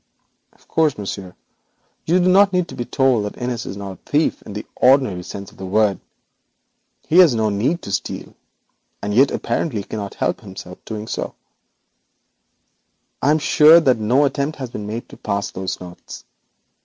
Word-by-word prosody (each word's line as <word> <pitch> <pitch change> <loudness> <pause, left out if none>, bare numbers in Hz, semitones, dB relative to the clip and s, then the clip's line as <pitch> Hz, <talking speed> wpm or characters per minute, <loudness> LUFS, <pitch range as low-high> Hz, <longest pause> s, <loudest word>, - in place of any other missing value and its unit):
Of - - -28
course, 155 -4 +1
monsieur, 100 -2 -6 0.7
you 170 +3 +4
do 180 - +2
not 195 +1 +5
need 180 -1 +1
to - - -8
be 120 - -4
told 130 -5 +2
that 105 - -6
Innis 125 -1 -3
is 100 - -6
not 100 -1 -6
a - - -9
thief 150 +2 +1
in - - -10
the 105 - -6
ordinary 130 -8 +3
sense 100 +2 -8
of - - -21
the 95 - -7
word. 105 -1 +2 1.1
He 170 - +4
has 165 -9 +7
no 110 -1 +1
need 125 +12 0
to 100 - -6
steal, - - -4 0.7
and 105 0 -2
yet 135 +5 +5
apparently 115 -11 -2
cannot 100 -1 -6
help - - -1 0.4
doing 110 -1 -5
so. - - -4 1.9
I 140 - +2
am 155 - +5
sure 155 +1 +7
that 130 -7 +2
no 125 +7 +3
attempt 140 +2 -2
has 130 -4 -6
been 105 -2 -6
made 115 +3 -5
to - - -12
pass 100 -1 -2
those 95 0 -4
notes. 90 -1 -11
115 Hz, 175 wpm, -20 LUFS, 100-145 Hz, 1.9 s, has